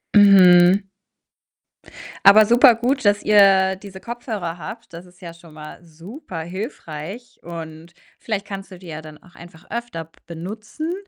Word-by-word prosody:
Mhm. 190 -1 +6 1.4
Aber 210 +2 +8
super 240 +1 +5
gut, 255 +4 -2
dass 205 0 +1
ihr 195 -2 +4
diese 190 -1 -12
Kopfhörer 220 -8 -6
habt. 215 +3 -10
Das 170 +2 -10
ist 180 +2 -23
ja 170 -1 -9
schon 170 -2 -18
mal 155 +3 -12
super 170 - -10
hilfreich 185 - -8
und 165 0 -10 0.3
vielleicht 210 -3 -4
kannst 195 -1 -8
du 185 - -11
die 180 -1 -15
ja 155 -1 -7
dann 155 -1 -13
auch 180 - -21
einfach 175 -1 -15
öfter 235 -8 -6
b 165 - -32 0.2
benutzen. 215 - -7
190 Hz, 150 wpm, -20 LUFS, 170-215 Hz, 1.4 s, Aber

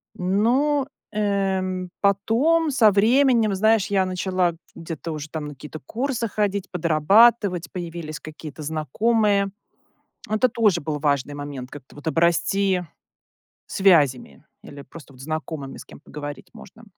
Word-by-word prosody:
Ну, 250 +10 +1 0.2
эм, 190 -3 -1
потом, 245 - +2
со 225 -5 +5
временем, 230 +1 +3
знаешь, 220 0 +3
я 195 -2 +1
начала 185 -1 0 0.2
где-то 165 0 -6
уже 155 0 -6
там 155 -2 -5
на 145 - -7
какие-то 150 +3 -10
курсы 240 - -2
ходить, 200 -2 -2
подрабатывать, 180 +4 +3
появились 170 -4 -6
какие-то 155 -1 -9
знакомые. 200 - +1 0.8
Это 215 +4 +2
тоже 210 -8 +2
был 150 0 -3
важный 145 -1 0
момент, 145 -3 -7
как-то 145 -2 -12
вот 145 +2 -10
обрасти 180 +3 +1 0.8
связями 155 -10 +2 0.2
или 140 -1 -11
просто 145 -1 -14
вот 130 - -17
знакомыми 155 -1 -5
с - - -10
кем - - -15
поговорить 145 0 -8
можно. 225 +4 -14
185 Hz, 125 wpm, -23 LUFS, 155-215 Hz, 0.8 s, со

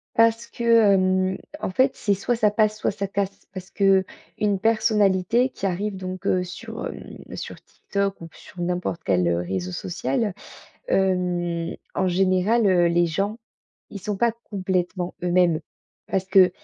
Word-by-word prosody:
Parce 230 0 +3
que, 235 - -7 0.3
hem, 185 0 +2 0.2
en - - -1
fait, 260 +8 +3
c'est 205 - +1
soit 200 +5 -1
ça 215 -2 +3
passe, 215 0 +2
soit - - 0
ça 200 0 -4
casse, 200 0 -3
parce 185 -1 -8
qu'une 195 +1 +1
personnalité 220 +1 +2
qui 200 - -6
arrive 195 +2 -1
donc, 185 -1 -6
heu, 180 -1 +2
sur, 180 0 -7
hem, - - -9 0.2
sur - - -6
TikTok 200 0 -3
ou 165 - -8
p 165 - -21
sur 180 - -11
n'importe 175 -1 -2
quel, 90 -2 +2
heu, 85 0 +2
réseau 90 0 -3
social. 175 - -2 0.5
Hem, 175 - 0 0.2
en 190 - +1
général, 190 +5 +2
heu, 180 -3 +4
les 170 +1 +3
gens 195 +6 -2 0.5
ils 200 - -6
sont 205 +1 -3
pas 235 +3 +3
complètement 185 -2 -2
eux-mêmes 175 -2 +3 0.5
parce 190 -1 -1
qu'on 190 -1 +6
190 Hz, 160 wpm, -24 LUFS, 180-205 Hz, 0.5 s, qu'on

